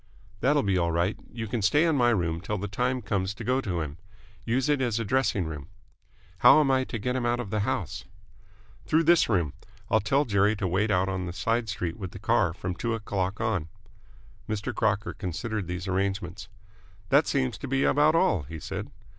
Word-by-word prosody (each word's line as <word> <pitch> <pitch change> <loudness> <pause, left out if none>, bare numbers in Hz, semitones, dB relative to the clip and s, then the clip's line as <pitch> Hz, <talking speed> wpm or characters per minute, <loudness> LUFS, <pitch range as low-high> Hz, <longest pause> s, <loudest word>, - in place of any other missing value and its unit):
"That'll 145 +4 +3
be 95 -2 +1
all 85 -1 +1
right. 85 +5 +1 0.2
You 115 -1 -5
can 115 +1 -2
stay 145 - +4
in 165 -2 +2
my 120 -3 +4
room 85 -7 0
till 105 +4 -3
the 100 +2 -3
time 125 +4 -1
comes 95 0 -1
to - - -7
go 130 +2 +1
to 90 -8 -2
him. 75 +1 -6 0.4
Use 125 +3 0
it 145 -2 +2
as 120 -3 0
a 115 - -2
dressing 110 -5 +1
room." 75 -3 -6 0.7
"How - - +8
am 140 -3 +3
I 130 0 +2
to 120 - -4
get 125 +4 -2
him 130 - -1
out 120 0 +1
of 110 -5 -5
the 105 - 0
house?" 105 - -2 0.8
"Through 160 +1 +3
this 170 -3 +4
room. 85 -9 +1 0.4
I'll 110 - +5
tell 135 +8 +1
Jerry 100 0 +2
to 100 -2 -2
wait 100 +5 +1
out 95 -1 +2
on 95 -1 -2
the 85 - -5
side 115 +4 -1
street 85 -6 -3
with 95 -3 -7
the - - -7
car 100 -4 +2
from 90 +2 -4
two 115 +5 -2
o'clock 100 -2 -2
on." 110 -8 -1 0.8
Mr. 105 -1 -2
Crocker 110 -1 0
considered 105 +1 -4
these 90 +1 -4
arrangements. 95 0 -2 0.6
"That 140 +3 +4
seems 130 -4 0
to 140 - -5
be 135 +1 +1
about 150 +3 +4
all," 95 - +3
he 80 +3 -8
said. - - -5
105 Hz, 210 wpm, -27 LUFS, 95-125 Hz, 0.8 s, How